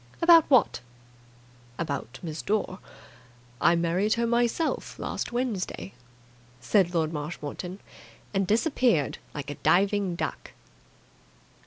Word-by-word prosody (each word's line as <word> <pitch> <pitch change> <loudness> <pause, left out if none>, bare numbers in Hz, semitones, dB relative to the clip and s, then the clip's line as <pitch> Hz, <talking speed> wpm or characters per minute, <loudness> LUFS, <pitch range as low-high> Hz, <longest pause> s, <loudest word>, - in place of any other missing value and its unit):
"About 335 -1 +7
what?" 255 - +4 1.0
"About 140 -7 -4
Miss 160 -2 -5
Dore. 205 -2 -1 0.8
I 170 - +5
married 175 +5 +1
her 235 0 0
myself 240 +7 0
last - - -4
Wednesday," 235 -6 -3 0.7
said 185 - +2
Lord 160 -1 +1
Marshmoreton, 155 +4 -5 0.6
and 195 -1 +1
disappeared 230 - +2 0.2
like 145 -1 -5
a - - -6
diving 195 -1 +2
duck. - - -5
190 Hz, 105 wpm, -27 LUFS, 165-235 Hz, 1.0 s, About